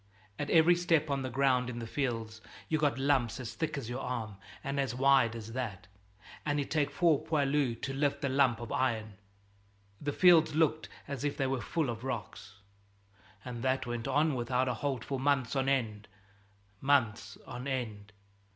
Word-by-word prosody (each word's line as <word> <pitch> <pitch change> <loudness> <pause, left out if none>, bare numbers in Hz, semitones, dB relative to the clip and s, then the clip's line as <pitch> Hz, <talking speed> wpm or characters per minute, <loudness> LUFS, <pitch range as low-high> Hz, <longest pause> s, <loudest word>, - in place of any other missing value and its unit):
At 145 - -2
every 165 +1 +6
step 165 -4 +1
on 140 -1 0
the 130 - -3
ground 130 -1 +2
in 120 - -5
the 115 - -4
fields 115 -4 -3 0.3
you'd 155 -1 +1
got 145 -5 +2
lumps 135 -4 +1
as 120 -3 -6
thick 160 -2 -2
as 135 - -5
your 120 +2 -4
arm 115 -6 -4 0.3
and 140 0 -2
as 130 -4 -1
wide 130 -3 +4
as 115 0 -7
that, 105 -7 -4 0.6
and 145 -1 0
it'd 140 - -3
take 150 -2 +2
four 155 0 +3
poilus 140 -5 +1
to 135 - -3
lift 140 +1 0
the 140 - 0
lump 130 -3 +3
of 120 -2 -7
iron. 110 -5 0 0.9
The 145 - -1
fields 165 -2 +5
looked 155 0 +1 0.2
as 140 -2 -5
if 145 -1 -1
they 135 - +1
were 130 -2 -1
full 160 +2 -1
of 115 +1 -7
rocks. 110 -6 -5 0.9
And 120 -2 -6
that 130 0 0
went 120 0 -4
on 150 +3 +2
without 125 +1 0
a 125 - +1
halt 130 -1 -2
for 135 -2 -3
months 135 -2 +1
on 135 0 +1
end, 110 -6 -1 0.7
months 130 -6 +1
on 125 +1 -7
end!" 110 -6 -4
130 Hz, 185 wpm, -31 LUFS, 120-145 Hz, 0.9 s, every